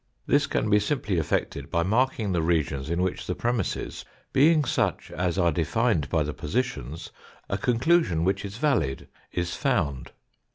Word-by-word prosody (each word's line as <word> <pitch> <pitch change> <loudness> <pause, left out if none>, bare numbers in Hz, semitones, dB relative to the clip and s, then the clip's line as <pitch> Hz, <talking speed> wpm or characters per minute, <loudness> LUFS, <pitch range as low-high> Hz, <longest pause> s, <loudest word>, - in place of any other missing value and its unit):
This 145 +3 +3
can - - 0
be 105 0 +4
simply 105 - -1
effected 80 - -2
by 85 - +1
marking 110 +1 +1
the 85 -2 +1
regions 75 -4 0
in 85 +2 0
which 95 - -2
the 90 - -1
premisses, 120 -5 -2 0.3
being 155 +2 +5
such - - -1
as 90 +2 -1
are 85 -3 +3
defined 85 +2 +1
by 80 -3 +2
the 75 0 -4
positions, 85 - -3 0.4
a - - -1
conclusion 125 - +2
which 95 +2 0
is 100 +1 -6
valid 115 - 0 0.2
is 85 -1 -2
found. 85 - -1
95 Hz, 160 wpm, -26 LUFS, 80-125 Hz, 0.4 s, being